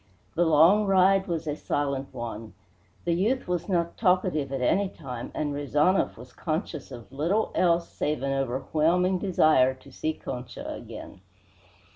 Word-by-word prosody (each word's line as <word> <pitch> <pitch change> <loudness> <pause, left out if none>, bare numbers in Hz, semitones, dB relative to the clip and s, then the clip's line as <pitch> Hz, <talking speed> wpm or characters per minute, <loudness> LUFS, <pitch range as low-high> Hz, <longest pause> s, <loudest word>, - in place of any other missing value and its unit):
The 175 +1 +2
long 170 +7 +5
ride 195 0 +4
was 165 -2 -2
a 150 -2 -2
silent 140 -3 -2
one. 115 -4 -7 0.5
The 170 - +2
youth 220 +10 0
was 180 +2 -2
not 170 -2 0
talkative 180 -8 +1
at 135 - -2
any 190 +10 +2
time, 125 -9 -7
and 145 -1 -1
Rezanov 145 +6 +1
was 125 +2 -12
conscious 155 -3 -4
of 120 0 -10
little 170 +11 0
else 170 -1 +2
save 150 -2 -2
an 135 0 0
overwhelming 155 +8 +1
desire 155 -8 +3
to 130 +1 -17
see 155 +4 -2
Concha 125 -4 -7
again. 90 - -10
155 Hz, 150 wpm, -27 LUFS, 135-180 Hz, 0.5 s, long